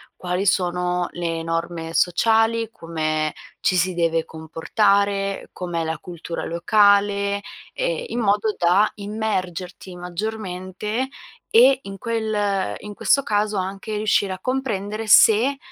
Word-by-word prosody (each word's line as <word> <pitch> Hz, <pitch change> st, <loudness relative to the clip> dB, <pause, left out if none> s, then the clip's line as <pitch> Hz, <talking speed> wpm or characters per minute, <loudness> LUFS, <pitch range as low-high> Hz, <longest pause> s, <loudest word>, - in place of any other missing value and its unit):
quali 180 Hz, +2 st, -2 dB
sono 180 Hz, -1 st, +1 dB
le 165 Hz, -1 st, -3 dB
norme 165 Hz, 0 st, -3 dB
sociali, 225 Hz, +5 st, +2 dB
come 155 Hz, -6 st, -2 dB, 0.3 s
ci 185 Hz, -, +1 dB
si 180 Hz, +1 st, +1 dB
deve 165 Hz, -1 st, +1 dB
comportare, 195 Hz, +5 st, 0 dB
com'è 175 Hz, -2 st, -3 dB
la 160 Hz, 0 st, -2 dB
cultura 170 Hz, -1 st, -6 dB
locale, 200 Hz, +2 st, +3 dB, 0.3 s
ehm, -, -, -2 dB
in 245 Hz, -, -3 dB
modo 210 Hz, 0 st, +1 dB
da 185 Hz, +5 st, +4 dB
immergerti 190 Hz, -4 st, -4 dB
maggiormente, 185 Hz, +4 st, -4 dB, 0.4 s
e 255 Hz, +4 st, +6 dB
in 195 Hz, 0 st, -8 dB
quel 215 Hz, -4 st, -1 dB
in 210 Hz, 0 st, -8 dB
questo 275 Hz, -, +3 dB
caso 210 Hz, -3 st, 0 dB
anche 195 Hz, +3 st, -4 dB
riuscire 205 Hz, -2 st, +1 dB
a 185 Hz, -, -8 dB
comprendere 225 Hz, -5 st, -2 dB
se, 225 Hz, +6 st, +6 dB
195 Hz, 120 wpm, -22 LUFS, 175-215 Hz, 0.4 s, e